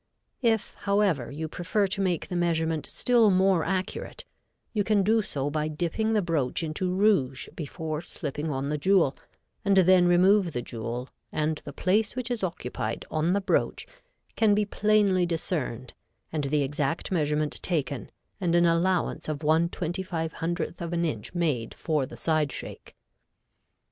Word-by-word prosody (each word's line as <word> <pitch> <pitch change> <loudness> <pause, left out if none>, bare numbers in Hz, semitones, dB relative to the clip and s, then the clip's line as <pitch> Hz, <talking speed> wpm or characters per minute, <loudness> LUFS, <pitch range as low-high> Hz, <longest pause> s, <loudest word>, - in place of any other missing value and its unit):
If, 225 -4 +1
however, 200 - +2
you 155 +3 -4
prefer 185 +6 0
to 195 +1 -1
make 180 -4 0
the 180 - -4
measurement 165 -2 0
still 235 -3 +4
more 190 -2 +3
accurate, 185 +1 -3 0.5
you 210 -2 +1
can 205 -1 +2
do 220 +3 +3
so 145 -8 -3
by 155 0 -1
dipping 175 +8 -1
the 210 -2 +2
broach 160 -3 0
into 165 +4 -2
rouge 180 -10 +2
before 155 0 -4
slipping 150 -2 -3
on 135 0 -2
the 150 0 -1
jewel 185 -5 +3 0.5
and 195 0 +3
then 185 -1 +6
remove 180 0 +4
the 120 - -2
jewel 120 +2 -5 0.2
and 155 0 -1
the 145 - -6
place 205 - +1
which 250 -1 -3
is 235 -4 -2
occupied 125 -10 -3
on 160 +3 +1
the 200 - +1
broach 195 - 0 0.5
can 215 -2 +4
be 210 0 +2
plainly 205 -3 +2
discerned 150 -7 -3 0.4
and 150 -3 -1
the 145 +1 +1
exact 145 +5 -2
measurement 150 -3 0
taken 145 -7 -2 0.3
and 175 -3 +1
an 175 0 +5
allowance 170 0 +1
of 155 - -1
1/2500 170 +1 -1
of 170 0 -4
an 170 0 +1
inch 115 - -4
made 150 -10 -1
for 150 -5 -1
the - - -11
side 155 -3 +1
shake. - - -8
170 Hz, 155 wpm, -27 LUFS, 150-190 Hz, 0.5 s, then